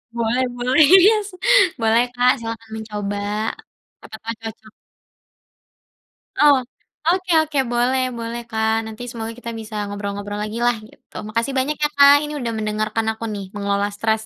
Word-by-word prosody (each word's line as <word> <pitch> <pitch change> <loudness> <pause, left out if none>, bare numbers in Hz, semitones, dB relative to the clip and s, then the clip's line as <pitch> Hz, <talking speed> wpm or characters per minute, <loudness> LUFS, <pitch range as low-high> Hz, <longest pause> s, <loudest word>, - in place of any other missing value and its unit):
Boleh 235 +3 +1
boleh, 250 +5 +3 0.2
iya 435 +2 +6
sih, 365 -2 -15 0.4
boleh 225 +1 +4
Kak, 250 +1 +4
silahkan 225 0 -7
mencoba, 210 -2 -4 0.8
siapa 220 - -11
tau 230 0 -3
cocok. 220 -1 -9 1.6
Oh, 290 -1 +6 0.6
oke 370 0 -2
oke, 310 -2 -4
boleh 250 +2 +2 0.2
boleh 230 +1 -4
Kak, 220 -1 +1
nanti 220 +2 -8
semoga 225 -2 -5
kita 235 -1 -6
bisa 220 0 -8
ngobrol-ngobrol 205 0 -5
lagi 215 +2 -5
lah 240 - +3
gitu, - - -24
makasih 230 +5 -2
banyak 280 +4 0
ya 295 - +5
Kak, 280 0 +8
ini 300 - -6
udah 235 -3 -2
mendengarkan 215 +1 -1
aku 220 - -10
nih 200 -2 -5
mengelola 200 0 0
stres, 220 +1 0
225 Hz, 150 wpm, -21 LUFS, 215-250 Hz, 1.6 s, Kak